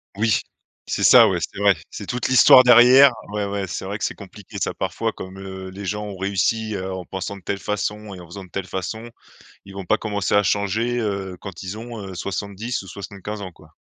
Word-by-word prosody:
Oui, 110 0 +2 0.5
c'est - - -2
ça, - - +8
ouais, - - 0
c'est - - -5
vrai, 100 -1 +4 0.2
c'est - - -8
toute 125 0 -2
l'histoire 130 0 +8
derrière 125 +3 +8 0.2
ouais, 105 -1 -1
ouais, 100 -1 -3
c'est 90 - -5
vrai 100 +2 -4
que - - -5
c'est - - -3
compliqué 100 0 -11
ça - - -1
parfois - - -2
comme, 95 +1 -9
heu, 95 -1 -8
les 100 +2 -8
gens 105 +2 -3
ont 100 -2 -7
réussi, 100 +3 0
heu, 95 0 -4
en 95 -1 -6
pensant 95 +2 -5
de - - -14
telle 100 +2 -3
façon 105 +1 -3
et - - -11
en 90 - -11
faisant 95 +4 -9
de - - -19
telle 95 +1 -4
façon, 110 +6 -5 0.5
ils 100 - -12
vont 100 -1 -6
pas - - +3
commencer 105 -3 -2
à 100 - +5
changer, 105 +5 0
heu, 100 -4 -3
quand 95 -4 -8
ils 95 +3 -6
ont, 115 0 -8
heu, 95 - -8
70 100 +6 -4
ou 95 - -13
75 100 +2 -7
ans 95 -2 -7
quoi. 80 -1 -19
100 Hz, 230 wpm, -22 LUFS, 95-110 Hz, 0.5 s, ça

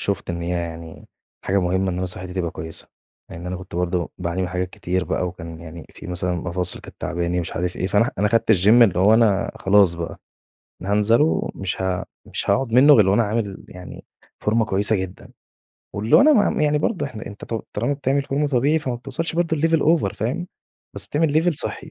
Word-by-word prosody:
شُفت 100 -2 -2
إن 85 0 -4
هي 85 - -4
يعني 85 -2 -6 0.4
حاجة 100 +1 +1
مهمة 95 +1 0
إن 90 - -4
أنا 95 0 -2
صحتي 90 0 -4
تبقى 90 -3 -2
كويسة، 80 0 -5 0.4
لإن 85 +2 -8
أنا 90 0 -3
كنت 95 -1 -11
برضه 90 -1 -1
باعاني 90 +1 -2
من 90 - -2
حاجات 90 0 -3
كتير 90 0 -2
بقى 90 - -1
وكان 85 -2 -9
يعني 85 0 -10
فيه - - -12
مثلًا 90 0 -1
مفاصل 90 +1 -1
كانت - - -13
تعباني 85 0 -1
مش 85 - -5
عارف 90 +1 -2
إيه، 95 - -2
فأنا 105 +4 +2
ه - - -3
أنا 105 +1 +2
خدت 115 0 +3
الGym 95 0 +3
اللي 95 -6 +3
هو 100 +4 +5
أنا 110 -4 +3
خلاص 95 -3 +4
بقى، 85 -1 -6 0.6
أنا 95 - -3
هانزله 105 +6 +4 0.3
ومش 95 0 -4
ها 95 -1 -1 0.2
مش - - -4
هاقعد 130 -3 +1
منه 140 +4 +7
غير 105 -6 +5
وأنا 110 +4 +3
عامل 105 -2 -3
يعني 90 0 -11 0.3
فورمة 110 +1 +1
كويسة 105 +1 +2
جدًا. 95 -1 -6 0.6
واللي 105 +3 +3
هو - - +7
أنا 305 +3 +6 0.2
ما - - -1
يعني 150 0 +2
برضه 180 +5 -1
إحنا 110 -2 -9
أنت 100 - -9
تُ - - -5 0.2
طالما 120 +7 -1
بتعمل 140 0 0
فورمة 145 +2 -1
طبيعي 140 +4 +2
فما 130 -5 -3
بتوصلش 135 +7 -3
برضه 165 -2 0
لLevel 165 +2 +2 0.2
over 100 -7 -2
فاهم، 125 - -3 0.5
بس - - -4
بتعمل 155 +1 +1
Level 175 -1 +1
صحّي، - - -2
95 Hz, 210 wpm, -22 LUFS, 90-120 Hz, 0.6 s, منه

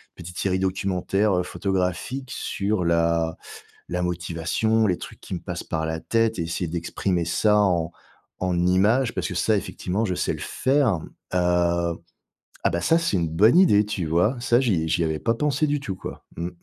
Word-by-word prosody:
petite 90 +1 -8
série 95 -1 +1
documentaire, 95 +2 0
heu, 90 - 0
photographique 95 +9 -2
sur 100 -1 -1
la 85 -1 +1 0.5
la 90 0 -1
motivation, 90 +6 0
les 90 - +1
trucs - - -10
qui - - -8
me - - -2
passent - - -5
par 80 0 -2
la 80 0 -2
tête 115 0 0
et 85 - 0
essayer 85 +1 -3
d'exprimer 85 +1 -1
ça 105 +5 +3
en 85 -5 +2 0.5
en 90 -1 0
images 110 +7 +3
parce - - -2
que - - -5
ça, - - +2
effectivement, 100 +5 -2
je 90 - -1
sais - - -1
le - - -7
faire, 130 - +1 0.3
heu. 85 -1 +2 0.7
Ah - - +4
bah, 85 - -1
ça, 165 - +4
c'est 165 -10 0
une 85 -2 0
bonne 105 - +5
idée! 105 - +5
Tu 100 -5 -3
vois? 90 - +2
Ça 120 -1 +3
j'y 90 -10 +1
j'y 85 - +1
avais 80 -1 -1
pas 115 - +1
pensé 150 +3 +1
du 145 0 0
tout, 100 -9 -5
quoi. - - -9
Mmh. 85 +1 -2
90 Hz, 190 wpm, -24 LUFS, 85-110 Hz, 0.7 s, bonne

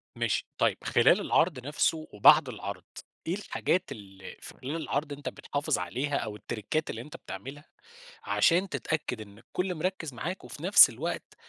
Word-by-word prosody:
ماشي - - -1
طيِّب - - +2
خلال - - +4
العرض 160 -6 +2
نفسُه 155 +2 0
وبعد 105 - +6
العرض، - - -6 0.4
إيه 170 - 0
الحاجات 185 -4 -1
ال 100 -6 -10 0.2
في - - -9
خلال 135 +5 -5
العرض 150 -2 -2
أنت 145 0 -5
بتحافِظ 145 0 -2
عليها 130 +11 -2
أو 105 -2 -4
التّْرِيكات 110 +9 -3
اللي - - -4
أنت 150 - -10
بتعملها، 135 +10 -9 0.6
عشان 180 +3 +3
تتأكِّد 145 -10 -2
إن 100 -1 -11
الكُلّ 180 +10 -3
مركِّز 165 -3 -3
معاك، 180 +10 -5
وفي 145 - -10
نفس 200 +3 +8
الوقت 160 +9 -5
145 Hz, 155 wpm, -29 LUFS, 115-170 Hz, 0.6 s, نفس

